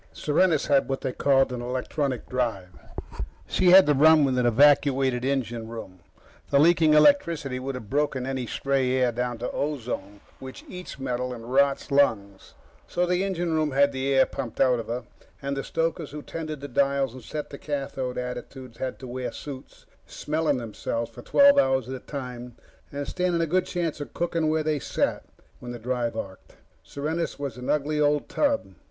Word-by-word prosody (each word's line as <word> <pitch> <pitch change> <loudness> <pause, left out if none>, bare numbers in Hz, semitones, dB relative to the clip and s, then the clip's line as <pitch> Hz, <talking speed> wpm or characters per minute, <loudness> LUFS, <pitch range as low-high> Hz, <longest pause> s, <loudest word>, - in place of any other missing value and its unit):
Serenus 155 0 +2
had 140 -2 +2
what 135 - -2
they 130 - -2
called 135 0 +2
an 120 - -4
electronic 130 +2 -2
drive. 115 -8 -2 0.8
She 185 - +2
had 190 +1 +9
to 150 - +3
run 155 +2 +6
with 130 -2 +1
an 120 - +2
evacuated 135 0 +4
engine 120 -4 -2
room. 110 -5 -9 0.5
The 140 - +3
leaking 160 0 +5
electricity 150 - +3
would 135 +1 -4
have 110 -4 -8
broken 135 0 0
any 130 -2 -3
stray 135 -1 0
air 130 -2 +2
down 120 0 -2
to 120 - -4
ozone, 120 -8 -4 0.2
which 130 0 -10
eats 180 -4 -8
metal 125 -1 -3
and 115 +2 -8
rots 140 +1 +2
lungs. 100 -9 +1 0.3
So 180 - 0
the 180 +1 +1
engine 175 -4 -1
room 155 -3 0
had 140 +1 +4
the 135 0 -2
air 135 -1 +5
pumped 125 -5 -6
out 125 -2 +4
of 115 - -6
her, 120 +1 -3 0.4
and 140 -1 -3
the 135 - -3
stokers 165 -1 -2
who 150 +1 -8
tended 155 -3 -6
the 145 - -5
dials 140 -1 +1
and 130 - -10
set 150 +5 -6
the 140 - -8
cathode 135 -3 -4
attitudes 125 0 -7
had 130 -1 -3
to 130 - -7
wear 125 +1 -4
suits, 135 -3 -10 0.2
smelling 155 -2 -1
themselves 115 0 -4
for - - -11
twelve 280 0 +6
hours 130 -2 +2
at 130 - -5
a 130 - -5
time 125 -3 -7 0.4
and 140 0 -4
standing 180 -2 0
a 165 - +2
good 180 +3 +1
chance 170 -4 -2
of 145 - -8
cooking 165 -2 0
where 155 0 +1
they 155 -1 0
sat - - -1 0.3
when 120 - -7
the 120 - -6
drive 120 -1 -2
arced. 95 -3 -8 0.3
Serenus 160 +4 -3
was 140 -5 -4
an 125 - -6
ugly 150 +1 0
old 145 0 +2
tub. 285 -1 0
135 Hz, 185 wpm, -26 LUFS, 125-150 Hz, 0.8 s, had